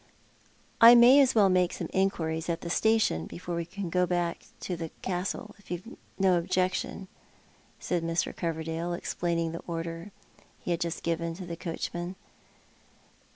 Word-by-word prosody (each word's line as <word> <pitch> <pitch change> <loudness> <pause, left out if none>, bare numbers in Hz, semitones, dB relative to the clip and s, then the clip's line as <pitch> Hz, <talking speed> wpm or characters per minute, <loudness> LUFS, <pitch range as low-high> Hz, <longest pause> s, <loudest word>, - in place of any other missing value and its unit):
"I 235 +1 +11
may 245 +4 +8
as 265 -3 +4
well 205 -3 +6
make 180 -1 +2
some - - -4
inquiries 165 -4 0
at 165 0 -1
the 170 - -5
station 220 - +2
before 175 0 -6
we 170 0 -2
go 180 0 -1
back 175 -1 -1 0.2
to 180 - -3
the 165 -1 -5
Castle, 190 +4 -3
if 205 - -20
you've 180 +6 -6 0.2
no 185 -3 +3
objection," 185 +2 -1 0.7
said 175 - -1
Mr. 165 +1 -1
Cover 165 -2 -3
dale, 165 +2 -3
explaining 170 -1 -2
the 165 - -6
order 165 +2 -5 0.5
he - - -4
had 170 0 -1
just 170 0 -3
given 165 0 -1
to 185 +1 -8
the 170 -1 -5
coachman. 175 +1 -5
175 Hz, 155 wpm, -28 LUFS, 165-185 Hz, 0.7 s, I